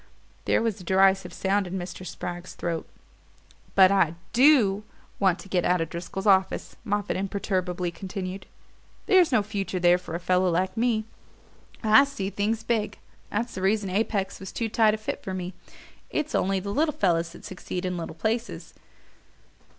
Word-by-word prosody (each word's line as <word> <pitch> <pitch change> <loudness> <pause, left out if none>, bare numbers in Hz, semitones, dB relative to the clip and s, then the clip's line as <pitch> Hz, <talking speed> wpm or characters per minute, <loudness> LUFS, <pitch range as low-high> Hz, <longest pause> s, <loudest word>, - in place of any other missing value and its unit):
There - - +2
was 220 -4 -1
a - - -10
derisive 190 +1 +3
sound 195 0 0
in 185 +2 -4
Mr. 180 0 -6
Spragg's 175 0 -6
throat. 165 -2 -3 0.9
"But 190 -1 +7
I 180 -5 +3 0.2
DO 235 -7 +5 0.4
want 190 -3 +3
to - - -12
get 180 -2 +1
out 180 0 +2
of 165 -1 -3
Driscoll's 180 +3 -5
office," 190 -2 +2
Moffatt 205 -3 -1
imperturbably 185 -2 -2
continued. 190 +1 -6 0.6
"There's 365 -5 +5
no 220 -5 +3
future 200 -3 -3
there 175 0 +5
for 170 -2 -7
a - - -2
fellow 180 +1 +2
like 185 +2 0
me. 225 -2 +1 0.8
I 220 +6 +7
see 205 -9 -4
things 215 +3 -1
big. 220 -3 -1 0.3
That's 235 +3 -2
the 185 - -5
reason 195 0 +1
Apex 200 -1 -1
was 190 - -8
too 230 -1 -2
tight 215 -1 +4
a - - -6
fit 215 - -4
for 190 - -5
me. 185 0 -5 0.6
It's 305 0 -2
only 195 0 +1
the 200 +2 -4
little 300 +3 +1
fellows 170 -3 +1
that - - -12
succeed 185 0 -5
in 180 0 -2
little 165 -2 -5
places. 230 +5 -3
195 Hz, 170 wpm, -26 LUFS, 180-215 Hz, 0.9 s, But